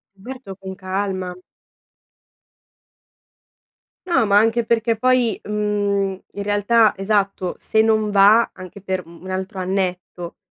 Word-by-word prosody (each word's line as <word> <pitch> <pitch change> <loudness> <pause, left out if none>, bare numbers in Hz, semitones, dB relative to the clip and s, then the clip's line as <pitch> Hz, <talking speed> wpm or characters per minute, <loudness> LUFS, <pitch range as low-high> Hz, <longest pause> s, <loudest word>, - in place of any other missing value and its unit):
Certo, 240 0 -9
con 190 0 -8
calma. 185 -1 -3 2.7
No, 335 -10 +3
ma 200 -1 +4
anche 225 +2 +3
perché 230 0 +1
poi, 250 -2 +2
mhmm, 205 -2 -1
in 200 - -4
realtà 205 +2 +3
esatto, 195 -2 -1
se 220 - +1
non 220 -1 +2
va 205 +3 +5
anche 185 +1 -11
per 185 -2 -3
mhmm, 170 +1 -15
1 190 - -8
altro 190 +1 -4
annetto, 180 -2 -3
200 Hz, 120 wpm, -20 LUFS, 190-220 Hz, 2.7 s, va